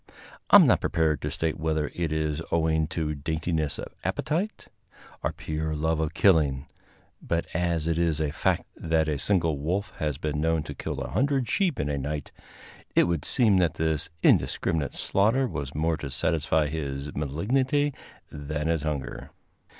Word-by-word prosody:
I - - +8
am - - +10
not - - +4
prepared 80 -4 +1
to - - -2
state 80 0 -2
whether 80 -2 -1
it 85 -3 -2
is 80 0 -1
owing 80 -1 +2
to 80 -1 -2
daintiness 80 0 -2
of - - -7
appetite 190 +8 -2 0.5
or - - 0
pure 80 0 -3
love 80 +1 0
of 80 -1 -2
killing, 75 -8 +3 0.6
but 85 0 -1
as 85 -2 0
it 85 0 +1
is 85 -3 +1
a 75 -2 0
fact 80 - 0
that 80 -1 0
a 75 -2 -1
single 80 -3 +1
wolf 90 +8 -2
has 75 -3 -2
been 75 -1 -2
known 80 -1 +1
to - - -7
kill - - -5
a - - -5
hundred 135 -2 +1
sheep 175 - +1
in 70 - 0
a 70 -1 -1
night, 75 +1 -4 0.6
it - - +6
would 85 -3 -1
seem 110 -7 +4
that 85 -3 +1
this 80 -2 0
indiscriminate 80 -4 +2
slaughter 115 +7 +2
was 70 - -5
more 80 +1 +1
to 75 -2 -6
satisfy 80 +2 +1
his 70 -2 -4
malignity 130 - 0 0.4
than 75 +1 -3
his 80 -2 +1
hunger. 75 -3 -4
80 Hz, 170 wpm, -27 LUFS, 75-85 Hz, 0.6 s, am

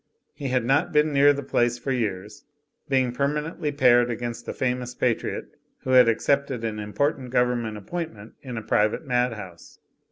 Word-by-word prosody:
He 140 - -5
had 125 -2 0
not 135 +4 +2
been 150 0 +2
near 140 +1 +6
the 140 0 -3
place 120 -2 +1
for 135 +3 -4
years, 105 -5 -3 0.5
being 130 -2 +2
permanently 150 +4 -2
paired 120 -4 +4
against 120 0 -5
a - - -2
famous 125 -1 -2
Patriot 120 -3 -2 0.3
who 130 - -2
had 125 -2 +7
accepted 135 +1 0
an 110 -1 -3
important 125 +6 -1
government 120 -3 0
appointment 110 - -6
in 125 -4 -7
a 110 - -5
private 105 +4 +1
madhouse. 115 -9 -3
125 Hz, 160 wpm, -25 LUFS, 115-140 Hz, 0.5 s, had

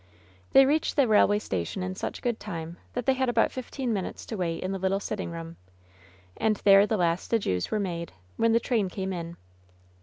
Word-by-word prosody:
They 270 - +8
reached 305 +3 +1
the 280 -4 +4
railway 205 -1 +5
station 95 - -3
in 185 0 -3
such 185 - -5
good 240 -2 -1
time 170 -4 -6 0.2
that 245 -1 -3
they 265 - +4
had 260 -1 0
about 235 -1 +2
fifteen 255 -1 -3
minutes 195 -3 -4
to 225 - -5
wait 170 -4 -2
in 185 - -2
the 195 - -3
little 190 +1 +1
sitting 200 -2 -4
room; 165 0 -7 0.8
and 220 -1 +1
there 200 0 +7
the 220 - 0
last 170 -1 0
adieus 95 - 0
were 215 - 0
made, 170 -4 -3 0.2
when 230 0 +2
the 230 - +4
train 225 -6 0
came 190 +1 -4
in. 170 -1 -6
195 Hz, 205 wpm, -27 LUFS, 175-230 Hz, 0.8 s, They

